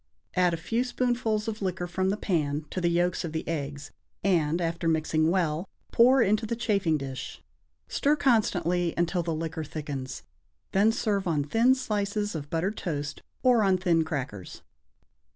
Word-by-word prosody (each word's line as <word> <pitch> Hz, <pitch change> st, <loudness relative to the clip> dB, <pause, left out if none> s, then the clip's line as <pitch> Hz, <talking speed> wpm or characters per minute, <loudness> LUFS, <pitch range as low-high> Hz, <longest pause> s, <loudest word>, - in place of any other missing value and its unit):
Add 180 Hz, -1 st, +3 dB
a 165 Hz, -, -1 dB
few 225 Hz, +9 st, -1 dB
spoonfuls 240 Hz, -4 st, 0 dB
of 220 Hz, -1 st, -3 dB
the 195 Hz, -, -3 dB
liquor 180 Hz, -1 st, -2 dB
from 185 Hz, +2 st, -1 dB
the 200 Hz, -, 0 dB
pan 150 Hz, -7 st, -1 dB
to 185 Hz, -, -2 dB
the 175 Hz, -, +2 dB
yolks 175 Hz, +1 st, +1 dB
of 165 Hz, -2 st, -5 dB
the 160 Hz, -, -3 dB
eggs, 145 Hz, -3 st, -4 dB, 0.3 s
and, 170 Hz, -4 st, +2 dB
after 170 Hz, 0 st, -1 dB
mixing 155 Hz, 0 st, +2 dB
well, 170 Hz, 0 st, 0 dB, 0.2 s
pour 250 Hz, +2 st, +6 dB
into 215 Hz, +3 st, +1 dB
the 235 Hz, -, -1 dB
chafing 200 Hz, -9 st, +1 dB
dish. 135 Hz, -2 st, -7 dB, 0.4 s
Stir 290 Hz, +2 st, +2 dB
constantly 180 Hz, -, +1 dB
until 175 Hz, +1 st, +1 dB
the 165 Hz, -1 st, -2 dB
liquor 160 Hz, 0 st, -3 dB
thickens, 140 Hz, -4 st, -6 dB, 0.5 s
then 205 Hz, +3 st, +4 dB
serve 205 Hz, -4 st, -1 dB
on 155 Hz, -4 st, +1 dB
thin 230 Hz, -, +4 dB
slices 210 Hz, -4 st, -1 dB
of 145 Hz, -3 st, -5 dB
buttered 185 Hz, +6 st, -1 dB
toast 145 Hz, -4 st, -4 dB, 0.2 s
or 250 Hz, -3 st, +5 dB
on 190 Hz, -2 st, +3 dB
thin 175 Hz, -3 st, +2 dB
crackers. 130 Hz, -, -5 dB
175 Hz, 170 wpm, -27 LUFS, 160-210 Hz, 0.5 s, pour